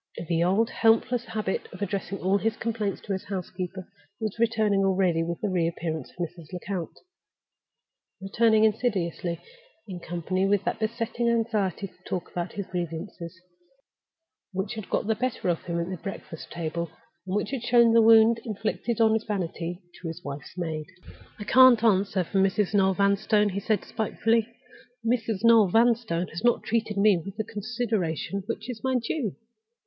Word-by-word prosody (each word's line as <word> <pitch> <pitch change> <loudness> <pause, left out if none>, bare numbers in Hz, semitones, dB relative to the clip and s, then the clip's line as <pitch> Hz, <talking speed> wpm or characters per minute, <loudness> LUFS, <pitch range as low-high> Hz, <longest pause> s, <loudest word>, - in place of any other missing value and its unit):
The 170 -1 +2
old 195 +6 +2
helpless 230 +2 +2
habit 210 -3 -3
of 185 +3 -6
addressing 195 0 -3
all 195 +2 +3
his 225 +1 -1
complaints 220 -3 -2
to 200 - -3
his 190 +1 -4
housekeeper 185 -1 -5 0.3
was 220 -1 -4
returning 220 -3 +2
already 185 -3 +2
with 170 0 -4
the 210 - 0
re 175 -3 +1
appearance 160 -4 -4
of - - -22
Mrs. 170 -2 -6
Lecount—returning 200 - -3
insidiously, 190 -6 0 0.5
in 185 -3 -6
company 175 +3 -1
with 200 -1 +2
that - - -2
besetting 230 +1 -1
anxiety 220 -5 0
to 180 -2 -13
talk 180 - -4
about 175 0 -4
his 200 -1 -4
grievances, 175 0 -5 1.1
which 195 +3 -3
had 215 -4 -7
got - - 0
the 220 - +2
better 240 -4 -2
of 170 - 0
him 170 -1 -2
at 170 - -2
the 185 - -4
breakfast 175 -2 -8
table, 170 0 -3 0.4
and 185 - -2
which 210 - -1
had 270 -4 -2
shown 235 -1 +5
the 230 - +7
wound 225 +1 +6
inflicted 220 +1 -2
on 220 -1 +5
his 220 0 0
vanity 180 -3 -3 0.2
to 170 - -5
his 165 +2 -7
wife's 140 +4 -8
maid. 160 -3 -3 0.5
"I 210 - -6
can't 250 +1 +7
answer 195 -3 +3
for 195 +3 -1
Mrs. 195 +1 +2
Noel 190 -2 +3
Vanstone," 205 +1 +3
he 195 +1 -3
said, 210 +1 0
spitefully. 225 +1 0 0.6
"Mrs. 225 -3 0
Noel 230 -3 +7
Vanstone 225 -4 +2
has 170 - -7
not 240 0 +3
treated 220 -2 -1
me 200 -3 +4
with 195 +1 -8
the 220 - 0
consideration 210 -5 -2
which 220 - -4
is 245 -3 -6
my 260 0 +1
due. 235 - -1
200 Hz, 165 wpm, -26 LUFS, 180-225 Hz, 1.1 s, the